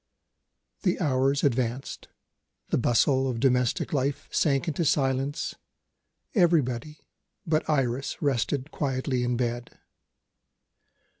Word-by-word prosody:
The 180 -3 +1
hours 140 -3 +1
advanced 130 -1 -1 0.6
the - - +2
bustle 130 +3 +3
of 120 -2 -3
domestic 125 0 +1
life 140 0 -1
sank 140 +2 +1
into 160 +2 0
silence 135 0 0 0.8
everybody 155 - +1 0.4
but 155 -1 0
Iris 135 -3 0
rested 140 0 -1
quietly 130 -3 -1
in 120 0 0
bed. 120 -1 -3
135 Hz, 95 wpm, -27 LUFS, 125-145 Hz, 0.8 s, bustle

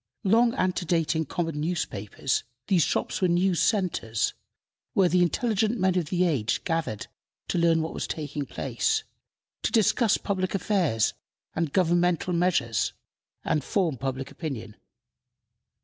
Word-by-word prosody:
Long 230 +4 +4
antedating 170 - 0
common 165 0 -3
newspapers, 135 - -2 0.2
these 185 -3 +3
shops - - 0
were 185 - +4
news 175 0 +2
centers, 175 - +1 0.6
where 190 -2 +4
the 180 +1 +3
intelligent 220 +5 +1
men 185 -1 +2
of 180 -3 +1
the 180 +4 +1
age 140 -11 0
gathered 165 - -2 0.4
to 175 - +1
learn 165 -1 +3
what 160 - -4
was - - -3
taking 150 -2 -4
place, 440 -1 -1 0.6
to - - 0
discuss 225 -1 +3
public 185 -1 -2
affairs 175 - +1 0.4
and 160 -2 -1
governmental 175 0 +2
measures, 170 -10 +1 0.5
and 150 - +1
form 175 -5 0
public 135 +1 -4
opinion. 130 -10 -6
175 Hz, 130 wpm, -27 LUFS, 150-185 Hz, 0.6 s, Long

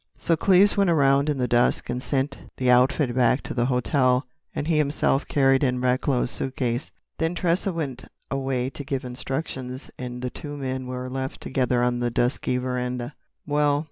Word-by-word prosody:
So 165 - +1
Cleves 195 +4 +4
went 200 -2 +3
around 140 -2 +3
in 145 - 0
the 125 -1 0
dusk 120 0 +2
and 125 +1 -3
sent 140 +1 -1 0.2
the 125 -1 +3
outfit 130 +1 +3
back 125 +1 +3
to - - -5
the 120 -1 +1
hotel, 125 0 +2 0.3
and 145 - -2
he 160 -2 +2
himself 145 -1 +1
carried 135 -3 +3
in 125 -2 +1
Recklow's 125 0 +1
suitcase. 130 0 -2 0.3
Then 165 +2 0
Tressa 175 +3 +1
went 140 -7 -4 0.3
away 135 -1 -1
to 145 - -7
give 135 -1 -3
instructions, 130 +1 -5
and 125 0 -6
the 125 - -2
two 145 -1 -7
men 130 -2 -3
were 125 0 -4
left 130 +1 -4
together 125 -2 0
on 125 0 +1
the 120 0 0
dusky 125 +1 0
veranda. 125 0 -3 0.3
"Well?" 145 -1 +2
130 Hz, 175 wpm, -25 LUFS, 125-145 Hz, 0.3 s, Cleves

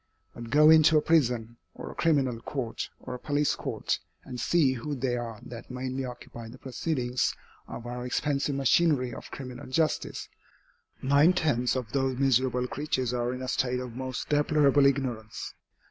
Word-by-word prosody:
But 120 -1 -8
go 150 +3 +7
into 160 0 +7
a - - +4
prison, 120 -7 +1 0.2
or - - -7
a - - -10
criminal 135 -8 +1
court, 120 -4 -4
or - - -7
a 125 - -6
police 145 +2 +1
court, - - -2 0.2
and 125 -2 -7
see 150 -4 +3
who 135 +4 -4
they 125 -1 -1
are 115 -2 -5
that 120 -2 -9
mainly 130 +1 -3
occupy 120 -2 -9
the 125 - -11
proceedings 130 -2 -1 0.3
of 120 - -8
our 125 0 -5
expensive 140 +2 -1
machinery 135 -2 +3
of - - -9
criminal 130 0 -8
justice. 155 +4 -1 0.8
Nine 140 +6 +5
tenths 135 -9 +1
of 125 -5 -3
those 135 -2 0
miserable 130 -2 +2
creatures 130 -3 -2
are 120 0 0
in 130 0 -5
a - - -4
state 125 0 0
of 125 -2 -6
most 130 0 -4
deplorable 145 -1 +4
ignorance. 125 -6 -2
130 Hz, 165 wpm, -28 LUFS, 125-145 Hz, 0.8 s, go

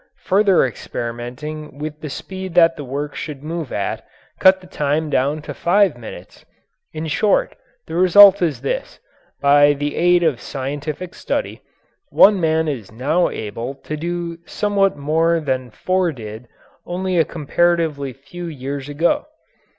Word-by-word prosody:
Further 195 -4 +4
experimenting 125 +6 -6
with 150 +1 -6
the 155 - -5
speed 190 +4 -7
that 165 -1 +6
the 145 - -7
work 145 +2 -4
should 145 -3 -7
move 160 -2 -5
at 100 - -3 0.4
cut 190 0 +6
the 185 - -16
time 150 -1 -1
down 145 +4 0
to - - -6
five 195 -2 +2
minutes. 120 -2 -11 0.5
In 155 +1 -5
short, 195 +6 +1 0.3
the 160 - -9
result 190 +3 +7
is 150 -9 0
this: 135 - -4 0.4
by 145 +1 +6
the 145 +1 -3
aid 175 0 +3
of 150 -8 +1
scientific 145 +6 -5
study - - -3 0.5
one 200 -1 +6
man 160 0 +1
is 120 -10 -4
now 145 +10 +1
able 115 +5 -5
to 150 +3 -6
do 170 +1 -4
somewhat 200 -3 +1
more 165 +3 +1
than 130 -4 -2
four 185 +8 0
did 110 -2 -9 0.4
only 180 0 -1
a - - +6
comparatively 160 -3 0
few 170 +7 -9
years 140 -2 -5
ago. 165 - 0
155 Hz, 145 wpm, -20 LUFS, 140-175 Hz, 0.5 s, result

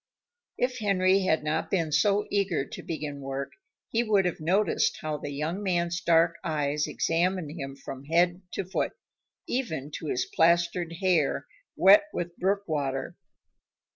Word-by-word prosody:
If 250 0 -1
Henry 195 -2 +3
had 160 -4 +2
not 150 0 -1
been 165 -5 0
so 205 +6 +3
eager 195 -8 +1
to - - -8
begin 150 -3 -5
work, 135 0 -4 0.4
he 230 - +1
would 210 -5 +2
have 180 - -1
noticed 180 +5 +1
how 155 -1 -2
the 145 - -5
young 155 +7 -3
man's 175 -3 0
dark 170 0 +3
eyes 150 -2 0
examined 170 -1 0
him 135 -4 -6
from 135 0 -9
head 175 +3 +2
to 195 - -2
foot, 190 - -2 0.5
even 160 - -3
to - - -6
his 380 -1 0
plastered 170 - +2
hair, 175 -7 +2 0.3
wet 200 +9 +7
with 175 0 -4
brook 195 +2 +1
water. 135 -4 -2
170 Hz, 150 wpm, -27 LUFS, 150-195 Hz, 0.5 s, wet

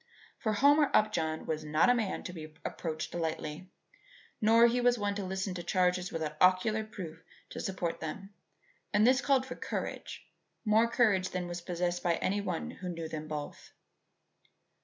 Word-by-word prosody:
For 220 -2 0
Homer 285 +6 +5
Upjohn 160 -7 +1
was 155 -1 -2
not 155 +1 +3
a - - +5
man 225 -5 -1
to 180 - -6
be 155 -2 -9
approached 155 -2 -4
lightly, 160 +1 -3 0.7
nor 225 +2 +6 0.2
was 245 0 +4
he - - -8
one 205 -1 0
to 200 0 -4
listen 190 0 -3
to 180 - -5
charges 180 0 +1
without 155 -2 -4
ocular 185 +4 +4
proof 170 -7 -8 0.3
to - - -6
support 175 -3 -3
them; 195 +6 -6 0.6
and 210 +2 +4
this 260 +2 +5
called 270 -2 +2
for 255 - -6
courage, - - -5 0.4
more 220 +2 +4
courage 210 -6 +2
than 180 -1 -3
was 175 0 -5
possessed 175 0 -2
by 170 -1 +2
any 200 +4 0
one 180 -4 -3
who 185 - -7
knew 165 -2 -4
them 155 -1 -6
both. 150 -1 -6
185 Hz, 170 wpm, -31 LUFS, 165-215 Hz, 0.7 s, nor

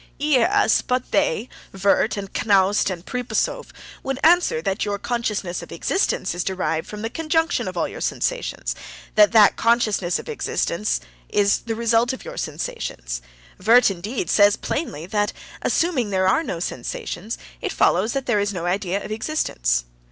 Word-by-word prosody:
"Yes, 305 +8 +3
but 250 0 -2
they—Wurt, 200 +1 0
and 200 -1 -4
Knaust, 200 -1 +3
and 180 -1 -6
Pripasov—would 255 +1 -3
answer 345 - +4
that 190 +4 -1
your 205 -1 -1
consciousness 210 -5 -2
of - - -11
existence 380 - 0
is 175 0 -2
derived 165 -4 -2
from 210 0 -7
the 225 - -1
conjunction 325 +2 0
of - - -5
all - - +1
your - - -9
sensations, - - -2 0.4
that 210 -1 +6
that 215 -3 +6
consciousness 220 -6 +2
of - - -9
existence 215 - -1 0.3
is 200 -1 +3
the 225 - -1
result 235 +2 +2
of 260 - -9
your - - -8
sensations. - - -4 0.4
Wurt, 235 +1 +6
indeed, 195 +2 -4
says 205 -1 +5
plainly 170 - -4
that, 205 +2 0 0.3
assuming 300 -10 +1
there 190 -1 +1
are 190 - +3
no 180 - -4
sensations, 190 +4 -4 0.2
it - - -2
follows 225 - +2
that 275 -1 -2
there 225 -4 +2
is 205 0 0
no 175 -3 -4
idea 190 +1 -1
of - - -7
existence." 60 - 0
210 Hz, 155 wpm, -22 LUFS, 190-250 Hz, 0.4 s, that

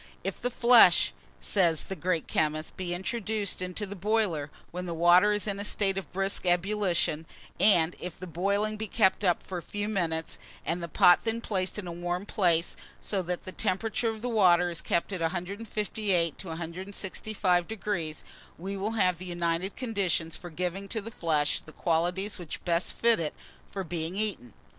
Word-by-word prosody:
"If 195 0 -4
the 245 - 0
flesh," 235 -7 +6 0.3
says 170 -6 +2
the 190 - -5
great 180 -3 -1
chemist, 155 0 -1
"be 185 -2 -4
introduced 205 +2 -2
into 185 +3 -3
the 200 0 -7
boiler 195 -7 0 0.2
when 180 +1 -5
the 170 - -3
water 175 +5 +6
is 210 -1 0
in 200 -2 -2
a - - -3
state 200 -2 +1
of 190 -6 -5
brisk 195 +2 +1
ebullition, 175 -3 +1 0.3
and 175 -5 +5
if 180 -2 -6
the 185 - -6
boiling 200 +5 0
be 220 +1 -4
kept 200 -1 +2
up 180 -3 +2
for 185 -2 -5
a - - -9
few 205 +4 -4
minutes, 165 -6 -2 0.3
and 170 +2 -1
the 170 - -4
pot 175 +2 +5
then 225 0 -1
placed 190 -5 -1
in 210 - -5
a 175 - -5
warm 175 +2 -3
place, 175 -6 +2 0.2
so 195 -2 -1
that 180 0 -3
the 185 - -6
temperature 220 +5 0
of 220 0 -6
the - - -1
water 180 -6 +4
is 170 - -2
kept 170 +4 0
at 180 - -3
158° 190 0 -1
to 190 - -8
165°, 180 0 -2 0.3
we 190 +4 -5 0.2
have 180 -4 +2
the 185 - -7
united 175 +1 -1
conditions 195 -9 -1
for 175 - -9
giving 180 +4 -3
to 220 - -2
the 225 +2 -8
flesh 155 -6 0
the 155 - -14
qualities 175 +6 0
which 175 -3 -7
best 170 0 +1
fit 230 -3 +4
it 155 -2 -2 0.3
for 195 - -4
being 170 0 -3
eaten." 200 - -2
185 Hz, 180 wpm, -28 LUFS, 170-205 Hz, 0.3 s, flesh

